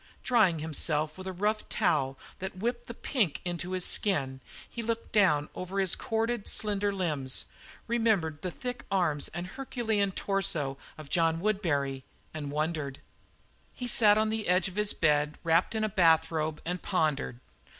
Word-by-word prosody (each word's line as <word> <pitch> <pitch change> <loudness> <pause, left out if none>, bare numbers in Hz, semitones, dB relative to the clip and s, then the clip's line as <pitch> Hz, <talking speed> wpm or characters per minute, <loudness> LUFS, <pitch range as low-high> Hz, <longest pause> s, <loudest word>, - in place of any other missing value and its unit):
Drying 215 -9 +4
himself 155 0 -1
with 185 0 -8
a - - -2
rough 210 +4 -1
towel 135 -5 +1 0.2
that 190 0 -5
whipped 240 - -2
the - - -7
pink 215 - 0
into 175 +1 -3
his 185 -1 0
skin, 135 -10 +1 0.3
he 235 - -6
looked 230 0 -3
down 175 -9 +4
over 185 +2 -5
his 190 -2 +3
corded, 225 0 -1
slender 205 -1 0
limbs, 150 -9 0 0.4
remembered 215 -10 +1
the 185 - -2
thick 245 +7 -5
arms 170 -7 +1
and 175 +1 -5
Herculean 220 -2 -1
torso 170 -9 0 0.2
of 155 -2 -11
John 165 -2 +2
Woodbury, 150 -10 0 0.3
and 150 -2 -4
wondered. 150 -2 -2 0.8
He 250 - -5
sat 215 -3 +5
on 215 0 +2
the 220 -1 -2
edge 180 +1 +3
of 185 - -8
his 210 0 +2
bed, 150 0 +2
wrapped 165 +6 +2
in 220 - +1
a - - +2
bathrobe, 160 -5 +2
and 180 +1 -2
pondered. 155 -9 0
180 Hz, 160 wpm, -29 LUFS, 155-210 Hz, 0.8 s, sat